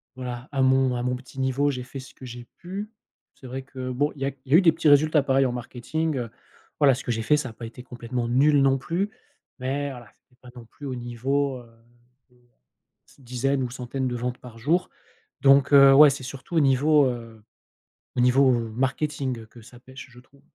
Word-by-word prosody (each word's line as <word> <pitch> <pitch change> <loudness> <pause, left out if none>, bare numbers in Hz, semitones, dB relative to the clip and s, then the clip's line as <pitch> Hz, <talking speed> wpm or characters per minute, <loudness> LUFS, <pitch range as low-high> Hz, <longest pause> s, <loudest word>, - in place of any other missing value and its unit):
voilà, 125 -1 -7
à 135 -1 -1
mon 130 -1 +3
à 120 - -3
mon 125 0 -1
petit 130 +1 -11
niveau 135 +2 +1
j'ai 125 -2 -5
fait 135 +1 -9
ce 130 - -12
que 130 - -12
j'ai 120 0 -9
pu. 200 +5 -7 0.4
C'est 130 - -16
vrai 130 +2 -5
que 130 -1 -6
bon, 145 +4 0
il 135 - -13
y - - +1
a - - +1 0.2
il 135 - -11
y - - +9
a - - +9
eu - - +6
des 165 - +6
petits 165 -2 +2
résultats 150 +1 +5
pareils 135 -1 +2
en - - -2
marketing, 130 +5 -3
heu, 120 -3 -4 0.5
voilà, 140 -4 +5
ce 130 - -8
que 120 - -2
j'ai 115 0 -2
fait, 150 +5 +3
ça 130 -4 -4
a - - -12
pas 115 - -9
été 125 +2 -12
complètement 120 -1 -5
nul 145 +4 +4
non 135 0 +3
plus. 180 +9 -2 0.5
Mais 140 +2 -2
voilà, 120 -3 -11 0.2
c'est 125 0 -31
pas 125 - -14
non 120 -2 -11
plus 140 +5 -11
au 130 - -4
niveau, 130 +3 -2
heu, 120 - -15 1.5
de - - -20
dizaine 130 +2 -1
ou 125 - -3
centaines 130 +1 -4
de 120 - -4
ventes 125 +1 -4
par 120 -2 -13
jour 165 +9 0 0.5
donc 140 +1 +5
heu, 140 -1 +8
ouais, 150 0 +8
c'est 135 -1 -5
surtout 135 +6 -9
au - - +5
niveau, 140 +1 +4
heu, 115 -3 -6 0.7
au - - +3
niveau 130 +1 +4 0.2
marketing 130 0 -2
que 120 +1 -16
ça 120 +2 -15
pêche, 130 +2 -12
je 120 - -15
trouve. 135 +2 -23
130 Hz, 225 wpm, -25 LUFS, 125-140 Hz, 1.5 s, y